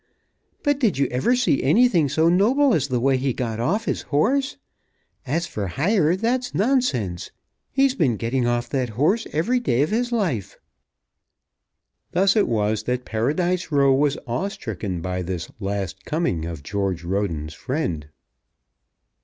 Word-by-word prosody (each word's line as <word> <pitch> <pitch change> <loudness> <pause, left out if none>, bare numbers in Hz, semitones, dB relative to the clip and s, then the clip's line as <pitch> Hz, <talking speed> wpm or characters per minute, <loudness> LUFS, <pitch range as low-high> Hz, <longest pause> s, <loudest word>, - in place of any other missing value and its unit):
"But 290 -2 +1
did 215 - +2
you 140 - +2
ever 130 - +2
see 245 - +2
anything 170 - +4
so 160 +4 +2
noble 240 +10 +4
as 145 -6 +1
the 125 -3 0
way 135 +2 +2
he 130 0 -1
got 115 -3 -3
off 200 - 0
his - - -1
horse? 260 - 0 0.7
As 165 +6 0
for 105 -10 -4
hire, 165 - +2
that's 245 +5 -1
nonsense. 135 - 0 0.4
He's 270 0 +3
been 135 - +1
getting 120 +2 0
off 120 0 0
that 130 -3 -1
horse 195 - +2
every 205 +12 +1
day 130 - +1
of 155 - -2
his 240 +2 0
life." 170 - -1 1.6
Thus 195 +1 +3
it 210 - +3
was 110 -1 0
that 125 0 -2
Paradise 170 +11 -1
Row 140 -2 +4
was 140 +1 +2
awe 120 +12 -2
stricken 100 - -5
by 90 +1 -3
this 90 -1 -5
last 95 -2 -4
coming 150 - -1
of 80 -4 -6
George 95 0 -2
Roden's 85 -5 -2
friend. 90 - -3
140 Hz, 155 wpm, -23 LUFS, -, 1.6 s, anything